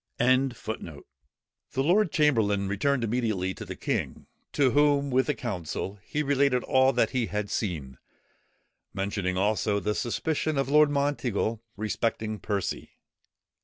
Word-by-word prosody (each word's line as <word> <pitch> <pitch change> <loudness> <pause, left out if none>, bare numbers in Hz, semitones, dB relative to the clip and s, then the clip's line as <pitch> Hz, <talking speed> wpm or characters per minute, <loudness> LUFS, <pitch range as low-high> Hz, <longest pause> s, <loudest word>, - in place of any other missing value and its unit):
] - - -51
The 120 - 0 0.7
lord 175 +9 +3
chamberlain 110 -10 +2
returned 125 +6 0
immediately 110 -5 -1
to - - -8
the - - -6
king, - - -3 0.3
to 135 -3 +3
whom, 145 -1 +3
with 130 +1 +2
the 150 - 0
council, 95 -2 -4
he 150 - -2
related 140 -3 +2
all 130 0 +4
that - - +2
he 125 -4 0
had 105 -1 -3
seen, 75 - -3 1.0
mentioning 95 -1 -1
also 105 +1 +1
the 105 +1 -1
suspicion 155 +6 -1
of 135 -1 0
Lord 150 +1 +6
Monteagle 135 -6 -1 0.2
respecting 110 0 -2
Percy. 100 -4 -3
115 Hz, 130 wpm, -27 LUFS, 100-140 Hz, 1.0 s, Lord